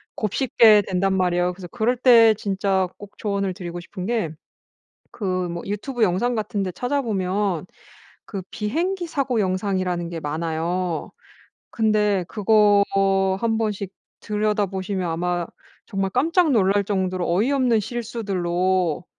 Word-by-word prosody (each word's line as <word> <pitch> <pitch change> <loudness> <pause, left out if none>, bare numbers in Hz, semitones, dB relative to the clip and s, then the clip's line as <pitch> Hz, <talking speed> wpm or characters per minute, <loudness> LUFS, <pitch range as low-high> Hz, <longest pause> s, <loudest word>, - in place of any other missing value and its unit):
곱씹게 215 -1 +4
된단 190 +1 +1
말이에요. 180 -1 +1
그래서 180 0 -9
그럴 235 +7 0
때 230 -3 +7
진짜 195 -2 0
꼭 205 0 -13
조언을 200 -2 -1
드리고 175 -1 -6
싶은 185 +1 -7
게 220 -6 0 0.8
그 215 - -7 0.2
뭐 170 0 -5
유튜브 225 +5 -3
영상같은 215 +1 0
데 185 -2 -3
찾아보면 205 - -1 0.6
그 195 -2 -5
비행기 345 - -2
사고 270 -7 0
영상이라는 185 -2 -1
게 165 -1 -5
많아요. 165 +3 -2 0.6
근데 210 -4 +1
그거 210 -1 +4 0.6
1 225 0 0
번씩 205 -4 -2 0.3
들여다 210 0 0
보시면 190 -1 -3
아마 175 +1 -1 0.4
정말 195 -1 -1
깜짝 325 - +2
놀랄 200 -3 +3
정도로 185 -3 -1
어이없는 245 +2 +2
실수들로 185 -7 -1
200 Hz, 270 characters per minute, -23 LUFS, 180-225 Hz, 0.8 s, 때